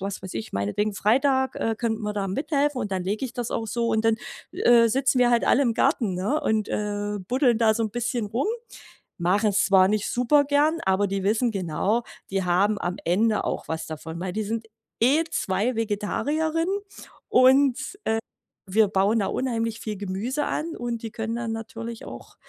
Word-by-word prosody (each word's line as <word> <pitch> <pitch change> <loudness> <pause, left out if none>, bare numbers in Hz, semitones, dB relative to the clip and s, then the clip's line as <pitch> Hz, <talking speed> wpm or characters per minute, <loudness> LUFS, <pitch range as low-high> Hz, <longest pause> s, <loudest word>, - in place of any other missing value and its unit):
was 195 0 -4
weiß 190 - -7
ich, 110 - -5
meinetwegen: 105 - -1
„Freitag, 265 +6 +2
äh, 225 -1 -1
könnten 225 -2 -1
wir 210 0 -2
da 200 -1 -2
mithelfen.“ 285 - 0
Und 205 -3 -3
dann 185 -1 -2
lege 210 +7 -2
ich 245 - -5
das 245 -3 -4
auch 225 - -2
so. 235 +1 -1
Und 220 0 +1
dann, 225 0 +3 0.4
äh, 235 -1 +5
sitzen 265 -1 +2
wir 245 - +5
halt 235 -1 +3
alle 275 - +4
im 235 -4 +1
Garten, 210 -5 +1
ne, 205 +12 0
und, 215 -1 0
äh, 205 0 -2
buddeln 250 -2 +3
da 220 -2 +4
so 230 - -1
'n 215 - -3
bisschen 240 0 -2
rum. 235 - -1 0.7
Machen's 200 +4 +2
zwar 190 -1 +5
nicht 210 0 0
super 285 +4 +3
gerne, 295 +3 +2
aber 190 +2 +3
die 195 0 -2
wissen 225 +4 +2
genau, 195 +4 0 0.3
die 195 -1 0
haben 195 +4 +2
am 175 +1 -2
Ende 210 +5 +2
auch - - -3
was 160 0 -3
davon. 160 +1 -7
Weil 180 0 -4
die 215 0 -1
sind 225 +2 -3 0.3
eh, 280 +8 +4
2 200 +6 0
Vegetarierinnen 305 - -1 0.6
und, 260 +1 +5 0.3
äh, 220 - +1 0.5
wir 210 +2 +3
bauen 200 +3 +2
da 195 - 0
unheimlich 230 -3 -2
viel 215 -2 -4
Gemüse 205 +9 -2
an 325 +2 -3
und 235 -1 -4
die 225 - -5
können 225 +1 -3
dann 235 -1 -3
natürlich 230 0 -6
auch - - -10
225 Hz, 190 wpm, -25 LUFS, 200-245 Hz, 0.7 s, äh